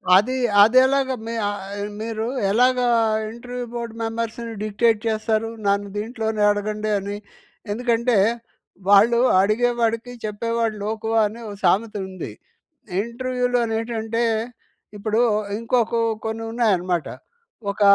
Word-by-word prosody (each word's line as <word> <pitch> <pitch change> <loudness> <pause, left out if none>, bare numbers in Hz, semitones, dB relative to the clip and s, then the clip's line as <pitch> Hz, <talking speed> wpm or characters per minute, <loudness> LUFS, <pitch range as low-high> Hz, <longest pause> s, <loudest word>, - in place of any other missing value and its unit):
అదీ, 225 +7 +3 0.3
అదెలాగా 260 +3 +4
మీ 230 - -3
ఆహ్, 205 -1 -3 0.2
ఆహ్, 205 0 -3
మీరూ 220 0 -3 0.3
ఎలాగా 250 +3 +3 0.4
ఇంటర్‌వ్యూ 245 +1 -6
బోర్డ్ 235 -1 -4
మెంబర్స్‌ని 230 0 -3
డిక్టేట్ 220 +1 +2
చేస్తారు, 220 0 0 0.2
నన్ను 200 0 +1
దీంట్లోనే 220 0 -2
అడగండి 210 +1 -1
అని. 200 +1 -5 0.5
ఎందుకంటే, 235 +1 +1 0.7
వాళ్ళు 215 +4 +6 0.2
'అడిగేవాడికి 230 +3 +1
చెప్పేవాడు 230 +1 -1
లోకువ' 220 +1 -2
అని 215 +3 -5
ఓ - - -6
సామెతుంది. 195 -3 0 0.7
ఇంటర్‌వ్యూలోనేంటంటే, 235 -1 -1 0.7
ఇప్పుడూ 215 +2 0 0.4
ఇంకొ 230 +2 +1
కో 230 - +2 0.2
కొన్నున్నాయనమాట. 220 -6 0 0.6
ఒక 200 - -10
225 Hz, 100 wpm, -22 LUFS, 210-235 Hz, 0.7 s, వాళ్ళు